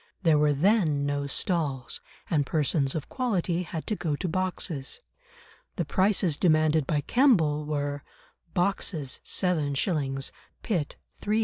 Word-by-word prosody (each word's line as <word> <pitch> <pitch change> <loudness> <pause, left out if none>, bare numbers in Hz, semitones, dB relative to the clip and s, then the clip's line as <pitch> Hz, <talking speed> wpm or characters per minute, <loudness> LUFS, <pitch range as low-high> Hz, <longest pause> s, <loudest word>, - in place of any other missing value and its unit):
There 160 -4 +4
were 150 0 +4
then 155 -3 +2
no 145 0 -1
stalls, 140 -5 -1 0.3
and 150 -4 +2
persons 145 -1 +1
of 155 - -3
"quality" 190 -9 -1
had 165 -2 -5
to 215 - -1
go 155 -6 -2
to 180 - -3
boxes. 175 -5 -1 0.8
The 175 - -1
prices 185 -1 +2
demanded 155 -4 +3
by 150 -2 +1
Kemble 160 - +3
were: 145 -1 -2 0.5
boxes 175 -6 0
7s.; 145 -5 0 0.3
pit 175 -10 -1 0.3
3s. 210 +2 +1
155 Hz, 125 wpm, -27 LUFS, 145-185 Hz, 0.8 s, There